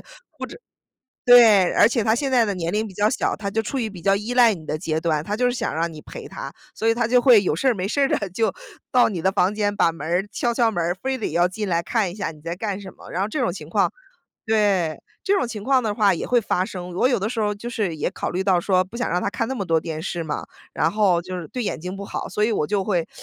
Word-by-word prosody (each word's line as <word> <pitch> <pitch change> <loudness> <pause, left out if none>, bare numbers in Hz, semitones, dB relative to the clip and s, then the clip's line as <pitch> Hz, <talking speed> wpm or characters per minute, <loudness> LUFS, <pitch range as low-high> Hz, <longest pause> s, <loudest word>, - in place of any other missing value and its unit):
者 - - -28 1.2
对， 225 -7 +7
而 - - +6
且 235 -1 0
他 220 +1 +3
现 270 +2 -1
在 250 -2 +5
的 205 - -1
年 170 -1 -3
龄 215 +1 0
比 190 - -12
较 205 +2 +2
小， 250 - 0
他 200 -2 -4
就 225 - 0
处 245 +5 -4
于 235 -4 -1
比 190 -4 -11
较 195 +3 +3
依 210 +4 -3
赖 240 -4 +5
你 160 -3 -12
的 155 - -2
阶 155 0 -2
段， 160 -3 0
他 205 +5 -3
就 250 - +1
是 245 - +2
想 245 - -2
让 165 +1 -1
你 155 - -10
陪 - - -9
他。 135 - -7 0.2
所 225 - -2
以 225 - +2
他 235 -1 +1
就 250 +1 +4
会 240 -6 +6
有 165 - 0
事 190 +11 0
儿 250 - +3
没 185 -1 -2
事 280 +7 0
儿 275 - +4
地 200 - 0
就 220 +4 +1 0.4
到 250 -1 +5
你 185 -6 -3
的 190 - +2
房 195 0 +2
间， 205 -1 0
把 170 - +3
门 160 -2 -8
儿， 175 +4 0
敲 240 - 0
敲 235 -1 +2
门 175 -5 -1
儿， 175 +2 0
非 260 +6 -3
得 220 - -2
要 175 +2 +3
进 200 +2 -4
来 170 -1 +1
看 195 +2 0
一 - - -10
下 195 -6 -3
你 155 -2 -16
在 165 +2 -4
干 200 0 -4
什 190 -2 -9
么， - - -13
然 180 - -2
后 200 - 0
这 295 - -3
种 235 -9 0
情 155 -5 -9
况 200 +4 +2 0.6
对， 200 -7 +1 0.2
这 400 - +3
种 380 -11 0
情 215 -3 -6
况 265 0 +3
的 215 -3 -1
话 205 -2 +4
也 170 - -3
会 245 - +3
发 185 -4 0
生。 180 -2 -7
我 220 +8 +3
有 255 - +2
的 205 +3 -2
时 235 -2 -2
候 210 -1 +1
儿 - - -5
就 230 +4 -7
是 205 -8 -2
也 150 - -1
考 - - -4
虑 185 +2 -2
到 185 -3 +3
说 185 0 +2
不 185 - -19
想 245 - -1
让 180 - +1
他 200 - -1
看 230 - -2
那 265 - -2
么 210 -6 -3
多 165 -2 +2
电 160 -1 -5
视 175 -1 -3
嘛， 155 -2 -4 0.3
然 165 - +1
后 195 -5 +2
就 185 +1 -7
是 165 - -9
对 250 - -4
眼 - - -3
睛 180 +3 -6
不 200 - -6
好， - - -5
所 210 - 0
以 225 - +1
我 150 - 0
就 200 +1 0
会 180 -6 0
200 Hz, 325 characters per minute, -23 LUFS, 175-225 Hz, 1.2 s, 对